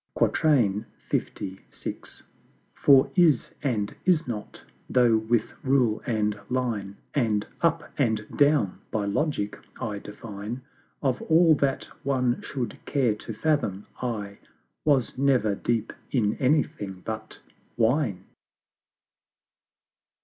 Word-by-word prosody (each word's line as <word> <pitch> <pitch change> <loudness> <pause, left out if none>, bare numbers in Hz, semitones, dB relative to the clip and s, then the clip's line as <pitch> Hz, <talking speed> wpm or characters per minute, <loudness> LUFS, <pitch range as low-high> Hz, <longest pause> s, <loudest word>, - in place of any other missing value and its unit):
LVI. 105 -7 0 1.1
For 135 -2 +5
"Is" 165 -9 +4
and 110 -8 -1
"Is 175 -5 +3
not" 105 -4 -6 0.3
though 120 -3 +5
with 110 0 0
Rule 130 -5 +2
and 105 -3 0
Line 115 -6 -2 0.2
And 110 -6 +1 0.2
"UP 165 -1 +2 0.2
AND 110 -5 +1
DOWN" 145 -10 +3
by 105 -2 -1
Logic 105 -1 -1 0.2
I 110 -5 -3
define, 105 +3 -7 0.4
Of 130 -3 +1
all 165 0 +5
that 135 -1 +1 0.2
one 125 -3 +1
should 125 -3 -4
care 130 -6 +2
to 105 - -8
fathom, 110 -6 0 0.2
I 105 -5 -3 0.5
was 140 -5 +2
never 130 -6 +3
deep 115 +2 -1 0.2
in 110 -5 +2
anything 110 -9 0
but 110 -1 -5 0.4
Wine. 115 -3 +2
120 Hz, 105 wpm, -26 LUFS, 105-140 Hz, 1.1 s, For